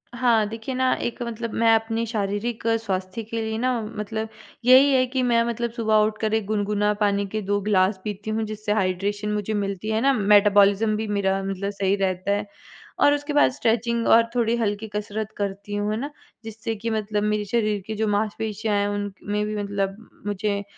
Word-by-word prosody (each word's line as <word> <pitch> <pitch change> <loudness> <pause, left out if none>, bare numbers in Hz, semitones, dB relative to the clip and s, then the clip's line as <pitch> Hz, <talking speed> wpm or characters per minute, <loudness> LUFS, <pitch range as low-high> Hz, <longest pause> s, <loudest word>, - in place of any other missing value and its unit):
हाँ, 235 -3 +3
देखिए 225 +4 -5
ना 260 0 +2
एक 240 +1 -4
मतलब 230 -1 -5
मैं 225 0 +4
अपनी 225 +1 -1
शारीरिक 215 +1 -2 0.2
स्वास्थ्य 190 +2 -3
के 225 +1 -4
लिए 220 0 -2
ना 255 +2 +1 0.3
मतलब 220 +1 -3 0.4
यही 265 +3 +7
है 255 -1 +4
कि 260 0 -1
मैं 235 -1 +3
मतलब 235 0 -2
सुबह 220 -2 0
उठकर 215 0 -2
एक 220 -2 +1
गुनगुना 210 0 0
पानी 200 -1 +2
के 215 +2 -3
2 205 0 +2
ग्लास 190 -1 +2
पीती 210 0 -5
हूँ 220 +1 -1
जिससे 215 0 -4
हाइड्रेशन 205 +2 -1
मुझे 210 +1 -2
मिलती 200 0 -2
है 220 +1 +1
ना, 275 +1 +4
मेटाबॉलिज़्म 205 0 +4
भी 220 0 -3
मेरा 195 -1 0
मतलब 195 +1 -3
सही 200 0 0
रहता 190 0 -1
है 205 +1 0 0.5
और 290 - +5
उसके 290 +1 -3
बाद 290 - +5
स्ट्रेचिंग 235 -2 0
और 230 0 +7
थोड़ी 235 -1 +2
हल्की 215 -1 -1
कसरत 210 +1 -3
करती 200 0 -4
हूँ, 205 +1 -1
है 215 - -1
ना, 285 +3 -4 0.3
जिससे 225 0 -5
कि 230 +2 -4
मतलब 210 -1 -1
मेरे 210 0 0
शरीर 215 -2 0
की 220 - -3
जो 220 0 0
मांसपेशियाँ 215 0 -1
हैं 200 0 +1
उनक 205 -1 -3
में 210 0 0
भी 215 0 -3
मतलब 195 -1 -2 0.3
मुझे 205 0 -1
215 Hz, 195 wpm, -24 LUFS, 205-225 Hz, 0.5 s, यही